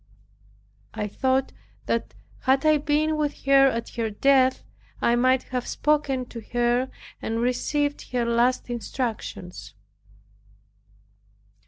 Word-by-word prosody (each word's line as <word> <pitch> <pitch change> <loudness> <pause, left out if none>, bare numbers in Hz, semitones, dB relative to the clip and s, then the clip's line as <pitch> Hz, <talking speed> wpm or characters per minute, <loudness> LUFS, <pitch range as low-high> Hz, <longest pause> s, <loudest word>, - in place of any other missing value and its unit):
I 210 - -2
thought 260 +5 0 0.3
that 230 - -2 0.2
had 270 +2 +2
I 310 -1 +5
been 305 +1 +1
with 300 -1 -2
her 275 0 +6
at 230 -3 -2
her 230 -2 -2
death 260 +4 +3 0.4
I 235 - +3
might 255 +1 +3
have 250 -1 -2
spoken 285 -4 0
to 230 - -8
her 240 +2 +2 0.3
and 225 +1 -2
received 285 +4 -1
her 245 -1 0
last 235 +2 +1
instructions. 230 - -5
255 Hz, 115 wpm, -25 LUFS, 235-275 Hz, 0.4 s, her